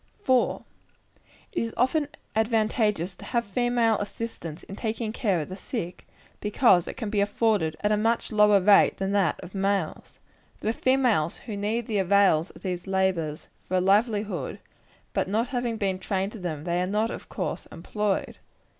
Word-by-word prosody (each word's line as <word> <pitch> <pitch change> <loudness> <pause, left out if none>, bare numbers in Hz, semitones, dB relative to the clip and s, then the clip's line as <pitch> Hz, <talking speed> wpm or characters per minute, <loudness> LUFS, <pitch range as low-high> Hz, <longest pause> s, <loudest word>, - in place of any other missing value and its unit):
4. 255 -2 +2 0.9
It 385 - -1
is 230 0 -3
often 285 +5 +2 0.3
advantageous 215 -4 +1
to - - -14
have 235 -1 0
female 235 +1 +1
assistance 205 -6 -6
in 195 - -9
taking 220 0 -3
care 200 -9 +1
of 150 - -6
the 185 - -5
sick, 185 -3 -6 0.3
because 210 -4 +3
it - - -6
can 220 -4 -4
be 205 -2 +2
afforded 205 -6 +1
at 210 - +1
a 210 - +3
much 230 +3 0
lower 210 -1 +5
rate 200 +2 +5
than 195 0 -1
that 195 -6 +1
of 185 - -10
males. 195 -3 -2 0.4
There 220 - 0
are - - -4
females 245 - +2
who 220 - -5
need 215 +3 -1
the 215 -3 -1
avails 190 -3 +4
of - - -16
these 180 -1 -3
labors 185 -5 -1 0.2
for 185 - +1
a - - +4
livelihood; 205 - +1 0.6
but - - 0
not 225 +5 0
having 245 -3 -2
been 195 -3 -1
trained 195 +1 -1
to 220 - -9
them, 160 -5 -4
they 175 +1 0
are 180 - 0
not, 215 +4 0
of - - -8
course, - - -4
employed. 210 -2 -2
205 Hz, 175 wpm, -26 LUFS, 185-225 Hz, 0.9 s, lower